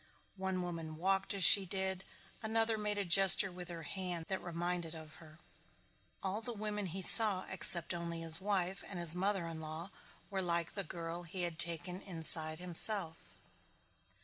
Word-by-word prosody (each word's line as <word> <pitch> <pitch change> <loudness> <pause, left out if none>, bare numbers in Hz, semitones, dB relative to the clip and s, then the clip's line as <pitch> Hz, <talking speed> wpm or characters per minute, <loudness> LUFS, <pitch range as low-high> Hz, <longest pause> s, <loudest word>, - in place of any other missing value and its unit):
One 190 -1 -5
woman 165 -3 -8
walked 190 +3 -2
as 195 - -1
she 195 +5 +8
did, 190 0 -3 0.4
another 225 0 -2
made 210 -1 -4
a 200 - -4
gesture 195 +2 +5
with 180 0 -11
her 170 -1 -10
hand 180 0 -7
that 190 - -5
reminded 175 -1 -6
of 155 -1 -12
her. 155 -1 -18 0.9
All 195 +3 -5
the 240 +1 -7
women 210 -1 -6
he 185 +3 -6
saw 205 -2 +6
except 175 -2 +3
only 170 -1 -7
his 165 +2 +4
wife 195 -2 -4
and 195 - -10
his 170 -2 +5
mother 190 0 -3
in 165 -1 -9
law 160 +4 -9 0.4
were 190 -1 -4
like 170 -2 -4
the 200 - -5
girl 170 +1 -9
he 175 +1 -7
had 170 -2 -6
taken 175 +2 0
inside 160 -4 +2
himself. 175 0 +2
180 Hz, 170 wpm, -32 LUFS, 165-195 Hz, 0.9 s, she